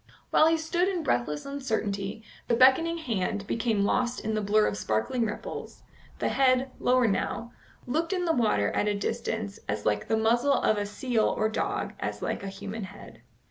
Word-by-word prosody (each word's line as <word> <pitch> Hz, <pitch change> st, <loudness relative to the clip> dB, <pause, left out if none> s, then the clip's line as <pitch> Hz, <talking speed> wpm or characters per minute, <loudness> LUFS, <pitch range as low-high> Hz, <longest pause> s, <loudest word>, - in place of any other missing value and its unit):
While 310 Hz, -, +6 dB
he 325 Hz, 0 st, +3 dB
stood 345 Hz, +3 st, 0 dB
in 365 Hz, -4 st, -1 dB
breathless 145 Hz, -, -1 dB
uncertainty, 220 Hz, -7 st, -3 dB, 0.2 s
the 235 Hz, -, +3 dB
beckoning 265 Hz, +7 st, +5 dB
hand 205 Hz, -, -2 dB
became 225 Hz, -2 st, 0 dB
lost 245 Hz, +3 st, +1 dB
in 220 Hz, -, -3 dB
the 215 Hz, -, 0 dB
blur 210 Hz, +1 st, +3 dB
of -, -, 0 dB
sparkling 200 Hz, -, 0 dB
ripples; 210 Hz, -, -7 dB, 0.3 s
the -, -, 0 dB
head, 260 Hz, 0 st, +3 dB
lower 250 Hz, 0 st, +3 dB
now, 230 Hz, +3 st, -1 dB, 0.3 s
looked 320 Hz, +8 st, -1 dB
in 365 Hz, -2 st, 0 dB
the 330 Hz, -, +2 dB
water 210 Hz, -, +2 dB
at 210 Hz, -, 0 dB
a 205 Hz, -, +1 dB
distance 220 Hz, 0 st, -3 dB
as 105 Hz, 0 st, -2 dB
like 105 Hz, -1 st, 0 dB
the 220 Hz, -, +2 dB
muzzle 235 Hz, +5 st, +3 dB
of 215 Hz, -, +2 dB
a 205 Hz, -, -2 dB
seal 230 Hz, +1 st, 0 dB
or 215 Hz, -, +1 dB
dog 220 Hz, -, -2 dB
as -, -, -4 dB
like -, -, -2 dB
a 200 Hz, -, -5 dB
human 200 Hz, +2 st, -6 dB
head. 195 Hz, +2 st, -13 dB
225 Hz, 185 wpm, -28 LUFS, 200-260 Hz, 0.3 s, While